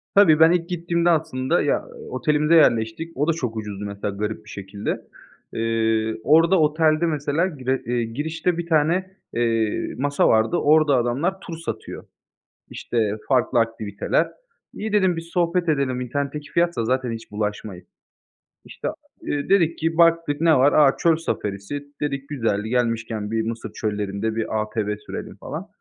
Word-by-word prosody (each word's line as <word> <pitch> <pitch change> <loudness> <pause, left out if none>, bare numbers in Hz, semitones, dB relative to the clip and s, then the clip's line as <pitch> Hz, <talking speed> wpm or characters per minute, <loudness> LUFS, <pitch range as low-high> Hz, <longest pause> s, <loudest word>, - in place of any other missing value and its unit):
Tabii, 160 -6 +6
ben 160 +1 +7
ilk 175 0 0
gittiğimde 170 0 0
aslında 155 -1 +1
ya, - - 0 0.2
otelimize 150 - +2
yerleştik. 120 +3 +2
O 145 +3 +1
da 165 - +3
çok 125 -8 -4
ucuzdu, 105 -1 -5
mesela, 100 0 -4
garip 105 +2 -4
bir - - -14
şekilde. 100 +1 -5 0.5
Eee, 110 -1 0
orada 165 +6 +5
otelde, 155 +1 +3
mesela, 150 +2 0
gire 130 -5 -2
iii, 120 -1 -2
girişte 160 +5 -1
1 170 - -3
tane, 175 +4 +1 0.2
eee, 115 -2 0
masa 145 +2 +2
vardı. 110 0 +3
Orada 150 -2 +4
adamlar 140 +11 0
tur 165 -1 -8
satıyor, 165 - -6 0.7
işte, 110 -3 -1
farklı 125 -2 +2
aktiviteler. 110 -3 0 0.5
"İyi," 215 0 -4
dedim, 190 -4 +3
"bir - - -2
sohbet 175 0 +1
edelim." 135 -4 +1
"İnternetteki 145 +3 -4
fiyatsa 170 -9 +1
zaten 125 0 0
hiç 115 0 -8
bulaşmayayım." 105 -3 -4 0.8
İşte, - - -6
a - - -2 0.3
iii, 145 -1 -3
dedik 170 -4 +3
ki 165 +1 -1
baktık, 165 -3 +3
ne 165 -2 +5
var? 135 +3 +4
"A, 145 -3 +5
çöl 165 -2 +3
safarisi," 105 -3 -4 0.2
dedik, 140 -1 -3
"güzel, 115 -7 0
gelmişken 115 -2 -1
bir 115 0 +1
Mısır 115 +1 -5
çöllerinde 105 +1 -2
bir 110 -1 -1
ATV 105 -1 -2
sürelim, - - -8
falan." 160 +9 -7
140 Hz, 155 wpm, -23 LUFS, 110-165 Hz, 0.8 s, ben